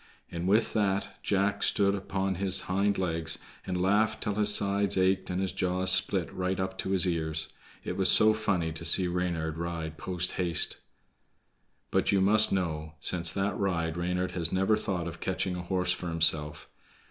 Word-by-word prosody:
And 85 +1 -4
with 110 +4 +2
that 100 -2 -2
Jack 100 0 -1
stood 100 -1 +2
upon 95 -1 -3
his 95 -1 +1
hind 100 +2 -1
legs, 80 -3 -1 0.3
and 90 - -2
laughed 105 +4 +1
till 105 - -2
his 105 0 +1
sides 100 -1 +1
ached 95 0 +1
and 90 0 -2
his 95 -1 -2
jaws 95 0 0
split 95 - +1
right 95 0 -3
up 95 0 -3
to - - -3
his 95 -1 +4
ears. 80 -2 +2 0.3
It - - -5
was - - +4
so 110 0 +6
funny 95 -7 -1
to 80 - -6
see 95 - +4
Reynard 85 -3 -3
ride 80 -2 -5
post 90 -1 -1
haste. 85 -2 +3 1.1
But - - +1
you 100 - +2
must 105 +3 +5
know, 80 -5 -3
since 85 +3 +1
that 100 -1 -2
ride 85 -4 -1
Reynard 90 +1 -2
has 85 -3 -1
never 95 +3 +1
thought 95 -5 -4
of 85 0 -8
catching 95 0 -2
a 90 - -5
horse 90 0 -1
for 90 - -7
himself. 80 -2 +1
90 Hz, 180 wpm, -28 LUFS, 85-100 Hz, 1.1 s, so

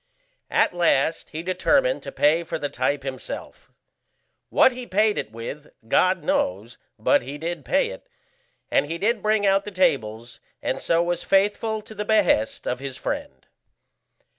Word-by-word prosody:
At - - +2
last 165 -3 +1
he 160 +2 -6
determined 345 - +2
to - - -7
pay 155 +3 +3
for 165 - -4
the 145 - -3
type 140 +2 -1
himself. 130 -2 -7 0.8
What - - +5
he 250 -1 -8
paid 210 +3 +2
it - - -4
with, 115 +6 -8 0.2
God 185 +8 +3
knows, 105 +7 -1 0.2
but 110 - +3
he 140 +4 -7
did 165 0 -4
pay 285 - +1
it, - - -11 0.6
and - - +2
he 165 +2 -3
did 215 +4 0
bring 215 -1 +2
out 195 0 +3
the 210 - -6
tables, 120 - 0 0.2
and - - -2
so 170 0 +2
was 175 0 -1
faithful 210 +2 +1
to 220 - -11
the 210 0 -3
behest 205 - +2
of 125 - -2
his 135 -1 -6
friend. 65 -1 -5
170 Hz, 165 wpm, -24 LUFS, 135-210 Hz, 0.8 s, What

